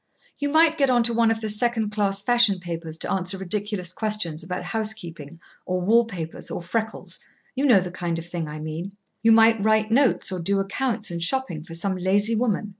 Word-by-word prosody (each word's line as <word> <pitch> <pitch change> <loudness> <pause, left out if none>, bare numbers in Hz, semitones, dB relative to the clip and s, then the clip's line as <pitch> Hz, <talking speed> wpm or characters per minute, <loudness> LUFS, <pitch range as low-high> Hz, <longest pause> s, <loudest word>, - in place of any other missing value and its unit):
You 285 0 -1
might 320 +1 +4
get 275 -2 +3
on 245 -2 +4
to 235 0 -1
one 230 0 +3
of 225 0 -1
the 220 - -2
second 220 0 +1
class 200 -2 0
fashion 240 -4 +4
papers 165 -2 -6
to - - -2
answer 190 0 0
ridiculous 190 -1 -3
questions 210 -8 -3
about 180 +2 -5
house 220 -1 -2
keeping 165 -6 -10 0.2
or 185 0 -2
wall 225 +6 +4
papers 170 -7 -7
or - - -5
freckles. 220 +5 -4 0.3
You 275 +2 +1
know 230 -7 +7
the 180 -1 -5
kind 175 -2 -3
of 165 - -6
thing 175 -2 -4
I 150 0 -7
mean. 160 +5 -6 0.3
You 225 +2 +5
might 225 -1 +5
write 220 0 +2
notes 260 -4 +2
or 185 - -3
do 195 +4 +1
accounts 215 +1 -1
and 170 0 -4
shopping 255 - -1
for 165 0 -9
some 190 +3 -1
lazy 200 +5 +1
woman. 215 -2 0
205 Hz, 210 wpm, -24 LUFS, 175-225 Hz, 0.3 s, know